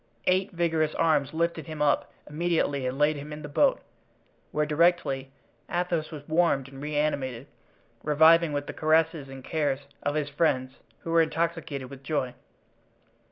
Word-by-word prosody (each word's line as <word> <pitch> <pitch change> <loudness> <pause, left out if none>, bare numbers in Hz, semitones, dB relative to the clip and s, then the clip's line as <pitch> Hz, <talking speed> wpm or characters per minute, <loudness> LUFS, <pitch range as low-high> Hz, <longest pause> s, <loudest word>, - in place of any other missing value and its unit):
Eight 185 +2 +2
vigorous 165 -3 0
arms 150 -4 +2
lifted 165 -2 -1
him 155 -1 -7
up 150 -1 +2 0.2
immediately 150 -4 0
and 130 +1 -3
laid 150 +1 +3
him 145 +2 -8
in 150 0 -7
the - - -5
boat, 270 - +3 0.7
where 150 0 +1
directly 150 -4 +1 0.4
Athos 175 -3 -1
was 145 -3 -9
warmed 160 -5 +2
and 135 0 -11
reanimated, 145 -4 -1 0.6
reviving 160 +2 +5
with 145 0 -2
the - - -6
caresses 160 -2 +1
and 135 -1 -9
cares 145 -3 -1 0.2
of 145 - -1
his 150 -2 0
friends, 135 -4 0 0.2
who 165 - -5
were 165 0 +5
intoxicated 160 -5 -2
with 135 -1 -10
joy. 135 -3 -2
150 Hz, 155 wpm, -27 LUFS, 140-165 Hz, 0.7 s, reviving